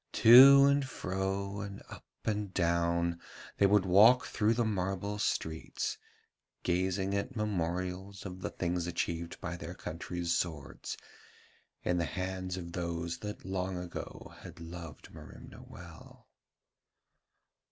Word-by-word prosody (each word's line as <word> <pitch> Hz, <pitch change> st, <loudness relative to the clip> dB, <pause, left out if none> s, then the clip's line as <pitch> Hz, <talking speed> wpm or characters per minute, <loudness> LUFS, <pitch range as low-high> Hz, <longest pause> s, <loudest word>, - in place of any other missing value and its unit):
To 135 Hz, +4 st, +9 dB
and 140 Hz, 0 st, +3 dB
fro 100 Hz, -4 st, -3 dB
and 100 Hz, 0 st, -7 dB
up -, -, -12 dB, 0.2 s
and 105 Hz, -3 st, -1 dB
down 85 Hz, -1 st, +1 dB, 0.4 s
they 100 Hz, -, +5 dB
would 100 Hz, -1 st, +4 dB
walk 110 Hz, +7 st, +6 dB
through 110 Hz, +1 st, +1 dB
the 120 Hz, 0 st, +1 dB
marble 100 Hz, 0 st, -2 dB
streets, 80 Hz, -6 st, -2 dB, 0.6 s
gazing 95 Hz, +2 st, 0 dB
at 100 Hz, +6 st, -2 dB
memorials 95 Hz, -1 st, -3 dB
of 95 Hz, -1 st, -7 dB
the -, -, -3 dB
things 85 Hz, -1 st, -2 dB
achieved 85 Hz, -1 st, -3 dB
by 90 Hz, -1 st, -5 dB
their -, -, -7 dB
country's 85 Hz, +1 st, -4 dB
swords 75 Hz, -9 st, -4 dB, 0.9 s
in 90 Hz, 0 st, +1 dB
the 85 Hz, -, +1 dB
hands 95 Hz, +3 st, -4 dB
of 85 Hz, -2 st, -7 dB
those 85 Hz, -1 st, -3 dB
that 105 Hz, 0 st, -7 dB
long 95 Hz, -1 st, -2 dB
ago 90 Hz, -1 st, -7 dB
had -, -, -11 dB
loved 85 Hz, -2 st, -9 dB
Merimna -, -, -12 dB
well. -, -, -13 dB
95 Hz, 125 wpm, -31 LUFS, 85-100 Hz, 0.9 s, To